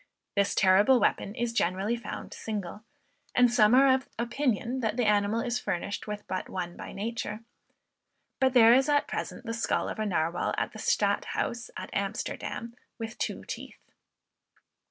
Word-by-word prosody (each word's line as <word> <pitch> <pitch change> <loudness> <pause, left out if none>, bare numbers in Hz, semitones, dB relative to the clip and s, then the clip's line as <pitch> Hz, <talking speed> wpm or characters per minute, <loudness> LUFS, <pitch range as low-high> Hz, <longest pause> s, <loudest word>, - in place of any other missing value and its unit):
This 200 0 +2
terrible 205 +7 +5
weapon 205 - 0
is 240 -2 -2
generally 195 +2 +1
found 230 -3 -7
single; 210 -1 -5 0.5
and 245 -1 +5
some 220 -1 +6
are 270 0 +6
of 260 0 -1
opinion 240 0 -1
that 220 -1 -1
the 245 - +2
animal 210 +2 +2
is 240 0 -1
furnished 200 +2 -3
with 210 0 -5
but 185 - -3
one 175 -2 -4
by - - -8
nature; 215 +1 -4 1.0
but 260 -1 +3
there 230 -2 +8
is 265 +3 +4
at 290 -1 +3
present - - -5
the 230 - -3
skull 230 - 0
of - - -5
a 215 - 0
Narwal 170 -2 0
at - - -1
the - - -10
Stadthouse 240 +1 0
at - - -7
Amsterdam, 230 0 -3 0.2
with 225 0 -6
two - - -3
teeth. - - -7
225 Hz, 160 wpm, -28 LUFS, 205-245 Hz, 1.0 s, there